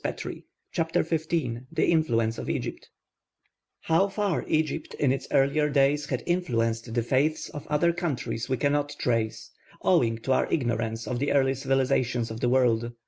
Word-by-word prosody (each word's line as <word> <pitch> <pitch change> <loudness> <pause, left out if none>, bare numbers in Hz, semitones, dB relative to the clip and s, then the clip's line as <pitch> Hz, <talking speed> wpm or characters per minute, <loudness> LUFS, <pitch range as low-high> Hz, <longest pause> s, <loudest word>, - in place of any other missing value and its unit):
CHAPTER 165 -1 +1
XV 160 -1 -2 0.4
THE - - +1
INFLUENCE 115 -9 +1
OF - - -5
EGYPT - - -4 0.9
How 165 +5 +3
far 200 -2 -1
Egypt 155 0 -1
in 140 -3 +2
its 135 - -2
earlier 145 +2 +2
days 145 +1 +2
had - - -2
influenced 115 -10 0
the 120 - +1
faiths 140 +6 +1
of 150 - -8
other 150 +3 +2
countries 140 -8 -3
we 130 - +1
cannot 145 +1 0
trace, 115 -3 -1 0.3
owing 115 -1 +3
to 135 - -2
our 130 - +2
ignorance 115 -5 -1
of 125 -1 -3
the 145 - 0
early 135 -1 +3
civilisations 130 -3 0
of 110 - -6
the 120 - +1
world. 120 -2 +2
135 Hz, 155 wpm, -27 LUFS, 120-155 Hz, 0.9 s, How